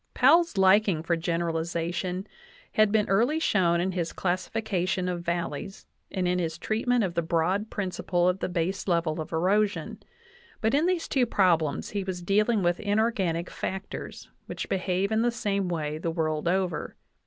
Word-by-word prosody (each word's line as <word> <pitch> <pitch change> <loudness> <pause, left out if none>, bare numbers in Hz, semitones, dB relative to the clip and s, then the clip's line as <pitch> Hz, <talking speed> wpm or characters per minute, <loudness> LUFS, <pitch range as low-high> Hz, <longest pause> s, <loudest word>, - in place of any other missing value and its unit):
Powell's 325 - +4
liking 190 -3 +4
for 170 +1 +1
generalization 170 +2 -2 0.5
had 215 -1 +3
been 215 -1 +2
early 235 +10 +2
shown 175 - +2
in 185 +2 0
his 175 -3 -3
classification 185 0 -1
of 175 -1 -2
valleys 170 +2 -4 0.2
and 185 -2 -1
in 180 0 +1
his 165 -2 -2
treatment 230 +5 0
of 185 -3 -2
the 170 - +1
broad 170 +6 0
principle 180 -3 -1
of 180 +1 +1
the - - -2
baselevel 170 -2 -1
of 155 - -5
erosion; 200 +5 0 0.6
but 220 +1 +1
in 300 +5 +3
these 360 -2 0
two 255 -3 +2
prob 185 -7 +3
lems 150 -2 -3
he 200 -1 -2
was 185 -2 -5
dealing 210 +3 +2
with 175 0 +1
inorganic 200 -5 0
factors, 190 +1 -6 0.2
which - - -5
behave 190 +1 0
in 220 0 +2
the 240 - +3
same 200 -5 -1
way 155 -3 -2
the 165 - -2
world 160 -1 -1
over. 180 -2 -1
185 Hz, 165 wpm, -27 LUFS, 170-210 Hz, 0.6 s, Powell's